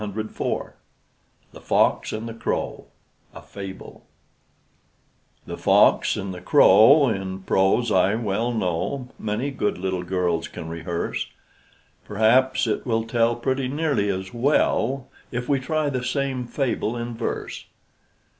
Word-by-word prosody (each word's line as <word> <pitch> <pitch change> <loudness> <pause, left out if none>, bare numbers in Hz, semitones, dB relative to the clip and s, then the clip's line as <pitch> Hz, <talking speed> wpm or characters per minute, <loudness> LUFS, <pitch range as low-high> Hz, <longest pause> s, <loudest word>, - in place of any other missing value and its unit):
DAVID 110 +1 -4
EVERETT - - -3 0.8
THE - - -13
FOX - - +2
AND 110 +2 -4
THE 115 - -6
CROW 115 - -3 0.5
A - - -9
FABLE 95 -1 -9 1.4
The - - -7
fox - - +4
and 95 -1 -4
the 90 - -9
crow, 135 - +6
In 95 -2 -4
prose, 95 +6 +2
I 95 +2 +3
well 115 +1 -1
know, 115 +5 -2
Many 110 +6 -2
good 115 -8 -1
little 95 0 -2
girls 90 -2 -1
can 80 - -8
rehearse: 85 +1 -3 0.8
Perhaps 120 +6 +3
it 110 - -1
will 115 -3 0
tell 115 +1 +1
Pretty 130 +2 -1
nearly 140 -7 0
as 95 0 -3
well, 135 0 +1 0.2
If 120 0 -4
we 140 -2 +2
try 155 +3 -1
the 130 -2 -2
same 130 -2 -2
fable 120 -3 -1
in 120 0 -4
verse. 115 - -4
115 Hz, 135 wpm, -23 LUFS, 95-130 Hz, 1.4 s, crow